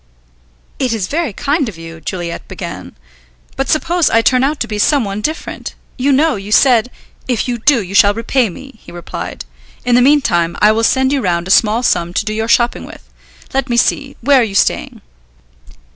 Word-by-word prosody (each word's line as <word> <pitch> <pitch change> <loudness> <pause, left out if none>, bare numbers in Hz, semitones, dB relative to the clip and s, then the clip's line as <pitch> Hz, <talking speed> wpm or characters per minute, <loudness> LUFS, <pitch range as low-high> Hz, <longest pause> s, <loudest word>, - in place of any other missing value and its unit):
"It 255 -3 0
is 215 -5 -2
very 315 - -2
kind 285 - -1
of 190 - -11
you," 165 0 -10
Juliet 170 +1 -5
began. - - -8 0.6
"But 270 - -2
suppose 340 +2 +1
I 230 0 +3
turn 255 +1 +3
out 285 +2 0
to - - -1
be 210 -1 -4
some 275 +2 +2
one 200 +1 -4
different. 315 +8 -5 0.2
You 275 +3 0
know, 300 0 +2
you 200 +1 -8
said 245 0 +4 0.2
" - - -34
"If 245 -2 -1
you 240 -1 -2
do, 255 -1 +3
you 185 +1 -9
shall 200 0 +5
repay 230 +1 0
me," 265 +5 -12
he - - -14
replied. 175 - -7 0.4
"In 245 - +1
the 245 - +5
meantime 235 - +2
I 210 - +5
will 225 +1 0
send 265 +3 +2
you 275 - 0
round 175 -4 -1
a - - -1
small 225 +3 +3
sum 175 -6 0
to - - 0
do 215 - -2
your 220 +1 -2
shopping 240 +1 +1
with. - - -13 0.5
Let 270 0 -1
me 240 - 0
see, 275 +3 0
where 275 +2 +4
are - - +3
you 205 -3 -4
staying?" - - 0
235 Hz, 205 wpm, -15 LUFS, 200-270 Hz, 0.6 s, shall